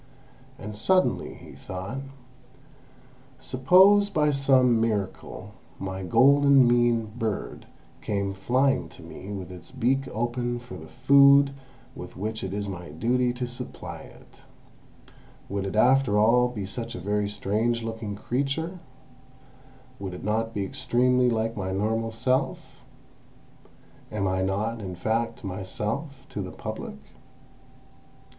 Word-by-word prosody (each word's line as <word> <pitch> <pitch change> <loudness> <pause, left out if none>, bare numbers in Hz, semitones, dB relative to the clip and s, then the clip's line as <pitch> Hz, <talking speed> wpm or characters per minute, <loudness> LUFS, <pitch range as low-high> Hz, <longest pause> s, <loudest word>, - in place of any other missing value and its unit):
And 105 +1 -7
suddenly 185 - +1
he - - -13
thought: 95 +8 -6 1.4
"Suppose, 190 +10 +5
by 150 -6 +2
some 130 -4 +4
miracle, 105 -4 -3 0.3
my 95 0 -5
golden 135 +5 +5
mean 120 -1 +3
bird 110 -4 -4 0.3
came 100 -1 -2
flying 130 +8 +1
to - - -14
me 100 - -9
with 95 -2 -6
its 90 -1 -11
beak 135 +3 0
open 120 +2 -2
for 120 0 -10
the 80 - -10
food 140 - +6 0.4
with - - -10
which 110 +3 -3
it 95 - -3
is 100 +1 -3
my 90 -3 -7
duty 120 +10 +1
to 125 0 -4
supply 120 +1 -7 1.5
it—would 100 -1 -2
it 95 - -5
after 125 -1 +4
all 120 +4 +5
be 110 -5 -5
such 115 +4 -5
a - - -5
very 105 +2 -1
strange 110 +3 -1
looking 110 -2 -5
creature; 140 - -2 1.2
would 95 -2 -5
it - - -9
not 110 +2 0
be 100 -3 -2
extremely 125 +1 +2
like 115 0 -1
my 95 -2 -3
normal 110 +4 0
self? 125 +4 -2 1.3
Am 100 -2 -1
I 95 0 0
not, 105 +4 -1
in 95 -3 -6
fact, 115 +7 -2
myself 105 - -4
the 95 -3 -5
Public? - - -6
115 Hz, 125 wpm, -26 LUFS, 100-130 Hz, 1.5 s, food